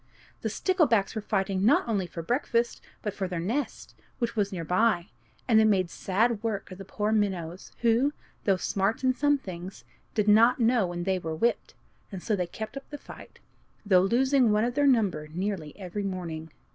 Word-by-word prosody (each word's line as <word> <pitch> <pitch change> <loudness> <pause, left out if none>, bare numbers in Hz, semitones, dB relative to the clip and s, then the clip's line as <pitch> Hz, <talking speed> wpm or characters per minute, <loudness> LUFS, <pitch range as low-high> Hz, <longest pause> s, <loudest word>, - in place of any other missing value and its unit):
The - - -1
sticklebacks 305 - +2
were 220 - -3
fighting 195 -2 -1
not 225 - +4
only 200 -5 0
for 165 -1 -7
breakfast, 235 - 0 0.2
but 210 -3 -2
for 195 -2 -3
their 180 -2 -3
nests, 230 +12 -3 0.2
which 235 -1 -2
were 210 - +3
near 180 -3 -4
by; 180 +1 +2 0.4
and 225 -3 +5
they - - +6
made 190 -5 +2
sad 215 +3 0
work 215 -4 -3
of 185 - -9
the 195 - -8
poor 210 +2 -2
minnows, 185 -5 -1
who, 235 +4 +3 0.3
though 195 -2 +3
smart 200 +6 -1
in 255 0 +3
some 290 +2 +2
things, 185 -5 -8 0.3
did 210 -1 +1
not 225 +5 +6
know 230 -4 +3
when 175 0 -4
they 190 0 0
were 160 -2 -4
whipped, 235 +9 -1 0.4
and 190 -3 -7
so 215 - +1
kept 220 +8 -7
up 275 - -8
the 290 - -6
fight, - - -13 0.5
though 185 -3 +5
losing 250 +4 +3
one 210 +2 +3
of 245 - -1
their 285 +2 +3
number 205 - +2
nearly 175 -1 -4
every 195 +1 -5
morning. 170 -5 -4
205 Hz, 190 wpm, -27 LUFS, 185-235 Hz, 0.5 s, they